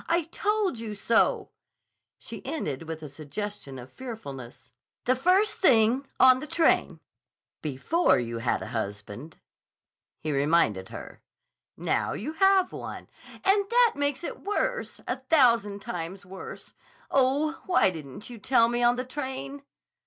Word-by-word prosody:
I 340 Hz, +1 st, +3 dB
told 400 Hz, -, -1 dB
you 220 Hz, -2 st, -5 dB
so," 225 Hz, +3 st, +2 dB, 0.7 s
she -, -, -9 dB
ended 160 Hz, -, -4 dB
with 160 Hz, -1 st, -6 dB
a -, -, -5 dB
suggestion 150 Hz, +1 st, -6 dB
of 125 Hz, +1 st, -10 dB
fearfulness, 140 Hz, -, -9 dB, 0.3 s
"the 255 Hz, -, +3 dB
first 370 Hz, +10 st, +3 dB
thing. 250 Hz, -, +4 dB
On 255 Hz, 0 st, +7 dB
the 305 Hz, -, -7 dB
train." 330 Hz, +1 st, +2 dB, 0.6 s
"Before 155 Hz, -, +2 dB
you 115 Hz, -1 st, -3 dB
had 120 Hz, +1 st, 0 dB
a -, -, -7 dB
husband," 105 Hz, +7 st, -5 dB, 0.8 s
he 155 Hz, -, -3 dB
reminded 140 Hz, -, +2 dB
her. -, -, -9 dB, 0.6 s
"Now -, -, 0 dB
you 300 Hz, +9 st, -4 dB
have 385 Hz, +2 st, +4 dB
one—" -, -, -7 dB, 0.3 s
"And 395 Hz, +1 st, +3 dB
that 480 Hz, -1 st, +5 dB
makes 285 Hz, +2 st, -1 dB
it -, -, -6 dB
worse! -, -, -2 dB
A 250 Hz, -, -1 dB
thousand 235 Hz, -8 st, +3 dB
times 180 Hz, +3 st, -5 dB
worse. 190 Hz, +1 st, -10 dB, 0.4 s
Oh, 280 Hz, +4 st, +2 dB
why 355 Hz, -, +4 dB
didn't 155 Hz, +1 st, -9 dB
you 240 Hz, -2 st, -9 dB
tell 230 Hz, +2 st, +4 dB
me 240 Hz, 0 st, -1 dB
on 240 Hz, 0 st, +4 dB
the 255 Hz, +1 st, -3 dB
train?" 275 Hz, +1 st, -5 dB
240 Hz, 140 wpm, -27 LUFS, -, 0.8 s, On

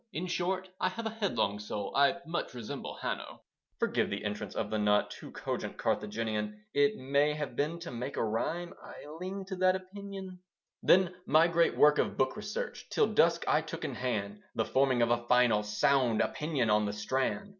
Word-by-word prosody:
In 170 Hz, -, -2 dB
short, 185 Hz, +1 st, -1 dB
I 185 Hz, -, +2 dB
have 225 Hz, +5 st, -6 dB
a 220 Hz, -, -1 dB
headlong 200 Hz, -, 0 dB
soul, 105 Hz, 0 st, -5 dB
I 140 Hz, +5 st, +4 dB
much 165 Hz, -5 st, -3 dB
resemble 115 Hz, -3 st, -6 dB
Hanno. -, -, -4 dB, 0.3 s
(Forgive -, -, +1 dB
the -, -, -4 dB
entrance 105 Hz, -1 st, -4 dB
of 105 Hz, -1 st, -2 dB
the 110 Hz, -, 0 dB
not 105 Hz, 0 st, +3 dB
Too -, -, -9 dB
cogent -, -, -4 dB
Carthaginian. 105 Hz, -1 st, -2 dB
It 145 Hz, 0 st, +3 dB
may 140 Hz, +3 st, +2 dB
have 150 Hz, -5 st, -4 dB
been 150 Hz, +6 st, 0 dB
to 170 Hz, -, -6 dB
make 125 Hz, +3 st, -5 dB
a -, -, +1 dB
rhyme; 160 Hz, +11 st, -2 dB
I -, -, -11 dB
lean 190 Hz, +2 st, -5 dB
to 190 Hz, 0 st, -5 dB
that 185 Hz, 0 st, +4 dB
opinion). 190 Hz, 0 st, -8 dB, 0.4 s
Then 185 Hz, -1 st, +5 dB
my 160 Hz, +2 st, +6 dB
great 170 Hz, 0 st, +2 dB
work 150 Hz, 0 st, +6 dB
of -, -, 0 dB
book 130 Hz, 0 st, +1 dB
research -, -, -5 dB
Till -, -, +2 dB
dusk -, -, +4 dB
I -, -, +4 dB
took -, -, -6 dB
in -, -, -3 dB
hand 105 Hz, -5 st, -3 dB
The 110 Hz, -, +1 dB
forming 130 Hz, -3 st, +3 dB
of 115 Hz, -, +2 dB
a 120 Hz, 0 st, 0 dB
final, 125 Hz, -4 st, +4 dB
sound 115 Hz, +3 st, +2 dB
Opinion 145 Hz, -8 st, 0 dB
on 105 Hz, 0 st, +3 dB
The 100 Hz, -, -2 dB
Strand. 130 Hz, -, -1 dB
135 Hz, 190 wpm, -31 LUFS, 110-175 Hz, 0.4 s, my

